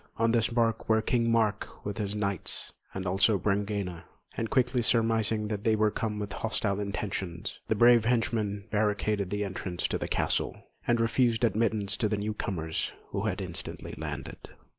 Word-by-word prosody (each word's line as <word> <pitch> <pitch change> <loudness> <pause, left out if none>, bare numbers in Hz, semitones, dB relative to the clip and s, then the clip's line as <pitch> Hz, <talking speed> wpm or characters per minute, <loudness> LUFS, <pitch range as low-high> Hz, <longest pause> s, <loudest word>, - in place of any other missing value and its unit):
On 115 0 +3
this 115 -1 +3
barque 115 -2 0
were 110 0 +5
King 115 +1 +1
Mark 110 -2 0
with 105 +2 -4
his 105 -1 -2
knights, 100 -3 -1 0.2
and 95 0 -5
also 95 +3 +3
Brangæna; 100 -2 -1 0.3
and 115 - -2
quickly 125 -1 +2
surmising 115 -2 +2
that 105 -2 -3
they 110 -1 +3
were 105 0 +3
come 105 -1 -2
with 105 -1 -4
hostile 105 -3 0
intentions, 95 -3 -4
the 110 - +1
brave 120 0 +6
henchman 115 -4 0
barricaded 105 -2 +1
the 105 +1 -1
entrance 90 -2 -3
to - - -1
the - - -3
castle, - - 0 0.3
and 120 -1 +3
refused 115 0 +2
admittance 110 -3 +2
to 105 - +1
the 105 - 0
newcomers, 100 -6 -2 0.2
who - - -2
had - - -2
instantly - - -3
landed. 75 -4 -6
105 Hz, 165 wpm, -29 LUFS, 100-115 Hz, 0.3 s, brave